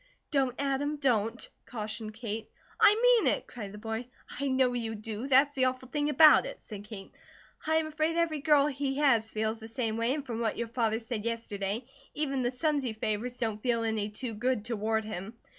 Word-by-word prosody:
"Don't, 265 -4 +1
Adam, 280 +1 0
don't!" 240 -5 0 0.2
cautioned 215 -1 -5
Kate. 225 -1 -5 0.3
"I 415 - +7
mean - - +5
it!" - - -10
cried 210 -5 -8
the 210 - -9
boy. 225 +3 -4 0.3
"I 280 - 0
know 260 -1 +2
you 225 -2 -3
do. 220 +3 -5
That's 280 +2 +5
the 260 -2 +2
awful 255 0 -2
thing 295 0 0
about 310 +9 +7
it," - - -8
said 205 -2 -9
Kate. 210 -2 -9 0.6
"I 315 - +3
am 320 0 +2
afraid 310 +2 -1
every 330 -3 +1
girl 285 -1 +5
he 275 -1 -2
has 240 -7 +3
feels 220 +1 -2
the 220 - -9
same 225 -1 -2
way, 230 +4 +1
and 295 -2 -5
from 235 -3 -4
what 225 -2 -1
your 235 -1 -3
father 225 -2 +1
said 225 -2 -4
yesterday, 230 -1 -3 0.3
even 275 -3 0
the 245 - +1
sons 290 +2 0
he 240 -4 -2
favours 220 +3 -2
don't 220 -4 -2
feel 235 -1 +1
any 220 -2 -1
too 225 +3 -5
good 220 0 -1
toward 220 -1 -1
him." 215 +1 -6
240 Hz, 205 wpm, -30 LUFS, 220-275 Hz, 0.6 s, I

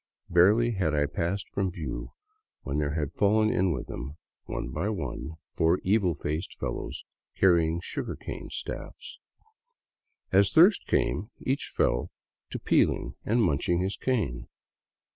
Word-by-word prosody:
Barely 105 +8 +5
had 90 -8 0
i 75 0 +3
passed 85 +7 -2
from 95 -1 -1
view 75 -9 -6 0.5
when 70 +2 -2
there 75 0 -1
had 75 -3 -2
fallen 110 +1 +3
in 95 0 +2
with 65 -6 -3
them, 70 +5 -7 0.3
one - - -4
by 85 +10 -1
one, 95 -5 -4 0.2
four 80 +2 +3
evil 95 -4 +2
faced 75 +5 -4
fellows - - -4 0.3
carrying 85 -3 +3
sugarcane - - -5
staffs. - - -7 1.1
As 100 +1 +4
thirst 180 +6 +6
came, 105 +4 0
each 135 +2 -2
fell - - +1 0.4
to - - -4
peeling - - +2
and 115 +2 +2
munching 85 +1 +1
his 95 +2 -1
cane. 80 - -1
90 Hz, 135 wpm, -28 LUFS, 75-100 Hz, 1.1 s, thirst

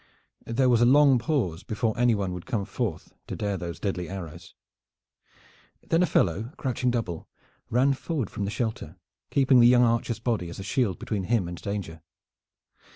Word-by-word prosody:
There 130 +3 +2
was 120 -2 +4
a - - +6
long 140 -1 +6
pause 115 - -1
before 110 0 -2
anyone 110 -6 +1
would 90 -1 -8
come 115 -7 -1
forth 100 -4 -4
to - - -5
dare 100 -1 -2
those 85 -2 -6
deadly 95 -4 -3
arrows. 85 -4 -8 1.3
Then 165 - +3
a 180 - +3
fellow, 105 - 0
crouching 125 -1 -1
double, 110 -9 -3 0.4
ran 130 +4 +3
forward 135 - -3
from 100 - -3
the - - -2
shelter, 110 0 -4 0.3
keeping 135 -2 +4
the 120 - +7
young 125 0 +6
archer's 115 0 +1
body 110 -7 -2
as 85 - -8
a 95 - -6
shield 105 - 0
between 100 -4 -3
him 110 -4 +1
and 85 0 -7
danger. 100 -6 -5
110 Hz, 170 wpm, -26 LUFS, 95-125 Hz, 1.3 s, the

